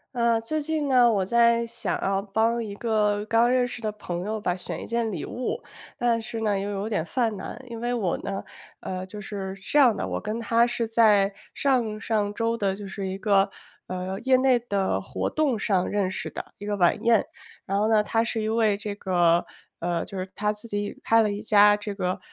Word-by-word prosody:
呃， 235 Hz, -1 st, +3 dB
最 305 Hz, +8 st, -2 dB
近 305 Hz, -1 st, -1 dB
呢， 250 Hz, -3 st, +5 dB
我 195 Hz, -4 st, +1 dB
在 235 Hz, +2 st, +3 dB
想 235 Hz, +1 st, -3 dB
要 195 Hz, 0 st, +1 dB
帮 225 Hz, +4 st, 0 dB
一 205 Hz, -, -6 dB
个 210 Hz, -2 st, +1 dB
刚 230 Hz, +2 st, +3 dB
认 250 Hz, -1 st, +3 dB
识 240 Hz, -, -8 dB
的 215 Hz, -1 st, -1 dB
朋 180 Hz, -4 st, -5 dB
友 215 Hz, +1 st, -2 dB
吧， 180 Hz, -4 st, -1 dB
选 180 Hz, -, -5 dB
一 -, -, -7 dB
件 230 Hz, -1 st, -1 dB
礼 175 Hz, -6 st, -4 dB
物。 250 Hz, -, -3 dB, 0.4 s
但 235 Hz, -1 st, +1 dB
是 225 Hz, +1 st, -6 dB
呢， 210 Hz, -2 st, +1 dB
又 200 Hz, +1 st, -3 dB
有 200 Hz, +1 st, -3 dB
点 205 Hz, -8 st, -1 dB
犯 225 Hz, +4 st, 0 dB
难， 205 Hz, +5 st, -7 dB
因 230 Hz, -1 st, -7 dB
为 240 Hz, +1 st, -1 dB
我 200 Hz, -8 st, 0 dB
呢 195 Hz, 0 st, -4 dB, 0.4 s
呃， 185 Hz, 0 st, -5 dB
就 205 Hz, +3 st, -9 dB
是 195 Hz, -2 st, -5 dB
这 295 Hz, -, -1 dB
样 255 Hz, -5 st, +7 dB
的， -, -, -2 dB
我 -, -, -3 dB
跟 215 Hz, +1 st, -3 dB
他 230 Hz, 0 st, +3 dB
是 240 Hz, -1 st, -2 dB
在 210 Hz, -3 st, +4 dB, 0.2 s
上 240 Hz, -6 st, +1 dB
上 210 Hz, -2 st, -1 dB
周 230 Hz, +2 st, 0 dB
的， 200 Hz, -4 st, 0 dB
就 205 Hz, -, -7 dB
是 195 Hz, 0 st, -5 dB
一 190 Hz, -, -4 dB
个， 195 Hz, -1 st, +3 dB, 0.4 s
呃， 185 Hz, +1 st, -4 dB
业 260 Hz, 0 st, +5 dB
内 260 Hz, -1 st, +4 dB
的 200 Hz, -5 st, -1 dB
活 -, -, -3 dB
动 285 Hz, -8 st, 0 dB
上 190 Hz, -3 st, +1 dB
认 200 Hz, -2 st, 0 dB
识 185 Hz, -, -5 dB
的， -, -, -8 dB
一 205 Hz, -, -7 dB
个 205 Hz, 0 st, -1 dB
晚 185 Hz, +4 st, +2 dB
宴。 230 Hz, -2 st, +4 dB, 0.4 s
然 195 Hz, -, -1 dB
后 210 Hz, +2 st, +2 dB
呢， 220 Hz, -1 st, +5 dB
他 225 Hz, +2 st, +1 dB
是 230 Hz, -1 st, -2 dB
一 215 Hz, -, -2 dB
位 220 Hz, -2 st, +2 dB
这 205 Hz, 0 st, -5 dB
个 175 Hz, -4 st, +2 dB, 0.3 s
呃， 170 Hz, 0 st, -1 dB
就 195 Hz, -, -8 dB
是 185 Hz, 0 st, -5 dB
他 210 Hz, 0 st, 0 dB
自 210 Hz, +2 st, -10 dB
己 205 Hz, -1 st, -3 dB
开 225 Hz, 0 st, +5 dB
了 215 Hz, -, +2 dB
一 205 Hz, 0 st, -4 dB
家 210 Hz, -1 st, +6 dB
这 210 Hz, 0 st, -5 dB
个， 185 Hz, -2 st, -2 dB
215 Hz, 240 characters per minute, -25 LUFS, 195-230 Hz, 0.4 s, 样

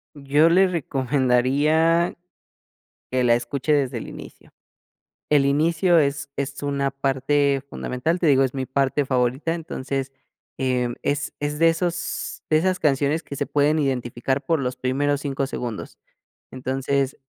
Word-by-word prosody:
Yo 145 Hz, +3 st, +3 dB
le 190 Hz, +3 st, +5 dB
recomendaría 145 Hz, +2 st, +2 dB, 0.9 s
que 130 Hz, 0 st, 0 dB
la 120 Hz, -1 st, +5 dB
escuche 130 Hz, +5 st, 0 dB
desde 135 Hz, -4 st, +1 dB
el -, -, -6 dB
inicio. -, -, -12 dB, 0.8 s
El 145 Hz, -2 st, +4 dB
inicio 165 Hz, +5 st, +3 dB
es 140 Hz, -1 st, +1 dB
es 140 Hz, 0 st, -4 dB
una 140 Hz, -1 st, -1 dB
parte 135 Hz, +1 st, +1 dB
fundamental, 160 Hz, +8 st, -2 dB
te 170 Hz, -, +1 dB
digo, 135 Hz, -2 st, +5 dB
es 130 Hz, -, -1 dB
mi 135 Hz, -1 st, -3 dB
parte 135 Hz, +1 st, 0 dB
favorita, 130 Hz, +5 st, 0 dB
entonces, 135 Hz, -4 st, -4 dB, 0.5 s
em, 125 Hz, -2 st, 0 dB
es 145 Hz, +1 st, -2 dB
es 145 Hz, 0 st, -2 dB
de 165 Hz, +1 st, +5 dB
esos 175 Hz, +1 st, -3 dB
de 155 Hz, -, +4 dB
esas 185 Hz, +2 st, +1 dB
canciones 145 Hz, +2 st, +1 dB
que 140 Hz, -, -8 dB
se -, -, -1 dB
pueden 150 Hz, +2 st, +2 dB
identificar 130 Hz, -1 st, -1 dB
por 165 Hz, -3 st, +1 dB
los 125 Hz, -1 st, -2 dB
primeros 140 Hz, +3 st, 0 dB
5 135 Hz, -1 st, -2 dB
segundos. 120 Hz, -5 st, -6 dB, 0.5 s
Entonces, 135 Hz, +1 st, -1 dB
140 Hz, 140 wpm, -23 LUFS, 130-150 Hz, 0.9 s, le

